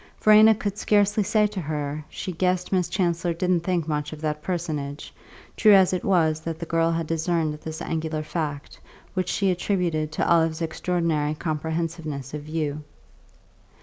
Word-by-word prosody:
Verena 215 +1 +7
could 205 0 -4
scarcely 205 0 +3
say 210 +2 +2
to 210 -2 -3
her 150 -1 -3
she 185 - -5
guessed 180 +1 0
Miss 185 -3 +1
Chancellor 175 -2 0
didn't 180 0 +1
think 175 -2 -1
much 150 -1 -2
of 155 - -8
that 150 -1 -2
personage, 150 -5 -4 0.4
true 215 -2 +6
as 190 -1 +5
it 180 - -1
was 160 -5 +2
that 160 0 -5
the 170 - -5
girl 165 0 +1
had 165 0 -1
discerned 165 -1 0
this 160 0 -6
angular 160 -1 -2
fact, 150 -2 -4 0.3
which 185 -1 -1
she 195 -2 +1
attributed 175 -4 -1
to 155 - -1
Olive's 165 -1 +3
extraordinary 160 -2 -1
comprehensiveness 160 -3 -3
of 150 - -4
view. 150 -1 -3
165 Hz, 160 wpm, -25 LUFS, 155-180 Hz, 0.4 s, Verena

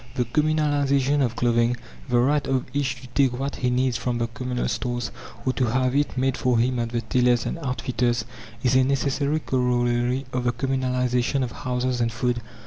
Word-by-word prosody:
The 125 - +1
communalization 145 0 +2
of 120 -2 -1
clothing 120 0 +2 0.3
the 120 - +3
right 140 +4 +2
of 130 -1 0
each 130 -3 -1
to - - -9
take 125 -1 +2
what 140 +2 -3
he 125 - 0
needs 125 -1 +1
from 125 -1 -2
the 115 - 0
communal 125 0 -3
stores, 120 -2 -2 0.3
or 130 - +1
to 130 - +1
have 130 +2 +1
it 145 -2 0
made 130 0 +1
for 125 -2 +2
him 125 +2 +1
at 115 -1 -1
the 120 0 -2
tailors 120 +1 +2
and 170 - -3
outfitters 125 -3 -1 0.4
is 130 0 +3
a 130 - +6
necessary 140 +3 0
corollary 125 0 +1
of 125 -1 -1
the 120 - +2
communalization 125 0 0
of 120 - -3
houses 125 0 -2
and 115 0 +1
food. 120 +1 -1
125 Hz, 190 wpm, -24 LUFS, 120-135 Hz, 0.4 s, a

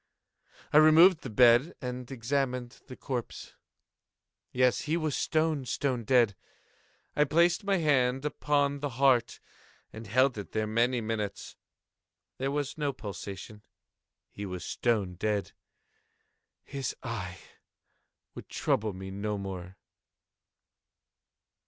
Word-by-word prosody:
I - - +7
removed 155 +3 +7
the 130 - -6
bed 120 +7 +5
and 125 -1 -6
examined 125 -1 -2
the 130 - -9
corpse. 125 -4 -5 1.0
Yes, 125 -1 +2
he 165 - +2
was 155 -4 -1
stone, 155 -3 0
stone 125 -2 -1
dead. 120 -4 +4 0.8
I 150 - +4
placed 170 +6 +2
my 200 -1 +1
hand 135 -4 +2
upon 145 -1 0
the 145 0 -2
heart 130 -4 +3 0.5
and 110 0 -9
held 130 +2 +2
it 100 - -9
there 110 0 0
many 120 +3 +1
minutes. 110 -2 -4 0.8
There 135 +1 -1
was 145 +1 -3
no 145 -1 0
pulsation. 100 0 -8 0.7
He 100 - -8
was 90 -2 -5
stone 105 -7 -1
dead. 105 +1 -1 1.1
His 135 -3 -4
eye 95 -8 -5 1.0
would - - -10
trouble 105 -1 0
me 95 +1 -8
no 105 +2 -3
more. 95 -2 -7
125 Hz, 115 wpm, -29 LUFS, 105-145 Hz, 1.1 s, I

